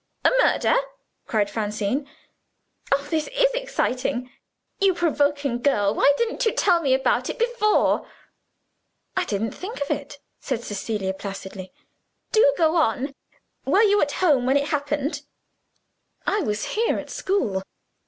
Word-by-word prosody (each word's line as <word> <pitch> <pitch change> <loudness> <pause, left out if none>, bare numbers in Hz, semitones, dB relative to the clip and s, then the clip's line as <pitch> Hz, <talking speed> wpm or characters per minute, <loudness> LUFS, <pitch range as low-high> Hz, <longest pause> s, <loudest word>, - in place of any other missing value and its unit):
"A - - +6
murder?" - - +3 0.5
cried 210 -2 +1
Francine. 215 +6 -2 0.8
"Oh, 280 +1 +2
this 315 -2 0
is - - +4
exciting! 255 - -2 0.5
You 390 -3 +3
provoking 290 -6 0
girl, 205 -7 +2
why 280 - +4
didn't 470 +1 -1
you 450 - +2
tell 350 -3 +3
me 270 -4 +3
about 265 - +1
it - - -4
before?" 470 -3 +2 1.1
"I 370 - +1
didn't 215 - -2
think 415 +6 -7
of 285 - -2
it," 285 0 -4 0.2
said 240 -4 -3
Cecilia 205 -2 -3
placidly. 190 -1 -7 0.6
"Do 480 +3 +5
go 325 0 +3
on! 275 -1 +1 0.5
Were 410 - +3
you 410 -1 +4
at 290 -1 +1
home 285 -9 +2
when 270 +2 +4
it 285 +1 -1
happened?" 290 0 -1 1.0
"I 415 - +1
was 210 - -2
here, 455 +2 +1
at - - -7
school." 245 - -1
285 Hz, 140 wpm, -24 LUFS, 225-375 Hz, 1.1 s, A